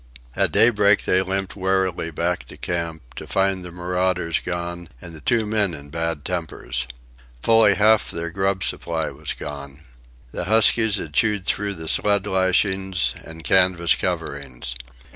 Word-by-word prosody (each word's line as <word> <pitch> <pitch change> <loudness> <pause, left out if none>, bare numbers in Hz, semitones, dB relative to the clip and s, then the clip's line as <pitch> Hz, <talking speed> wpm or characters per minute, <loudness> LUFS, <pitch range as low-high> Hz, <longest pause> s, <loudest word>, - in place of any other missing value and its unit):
At - - +2
daybreak 105 -3 +4
they 95 - +3
limped 95 0 -3
warily 95 -3 0
back 85 +2 -2
to - - -13
camp, 80 -7 -4
to - - -7
find 95 -1 +1
the 90 - -7
marauders 90 -1 -1
gone 85 -1 -5
and 85 +4 -10
the 80 - -11
two 115 +6 +1
men 105 -5 0
in 70 -1 -11
bad 80 -2 -2
tempers. 65 -8 -3 0.6
Fully 110 -3 +5
half 110 +3 +4
their 85 0 -4
grub 95 +1 0
supply 80 -2 -2
was - - -6
gone. 70 0 -8 0.5
The 85 - -4
huskies 110 +1 +4
had 80 -6 -6
chewed 105 +1 +1
through 100 -1 0
the 80 -1 -8
sled 100 +3 +2
lashings 95 0 +1
and 80 0 -11
canvas 90 -3 +4
coverings. 65 -4 -4
90 Hz, 150 wpm, -22 LUFS, 80-100 Hz, 0.6 s, Fully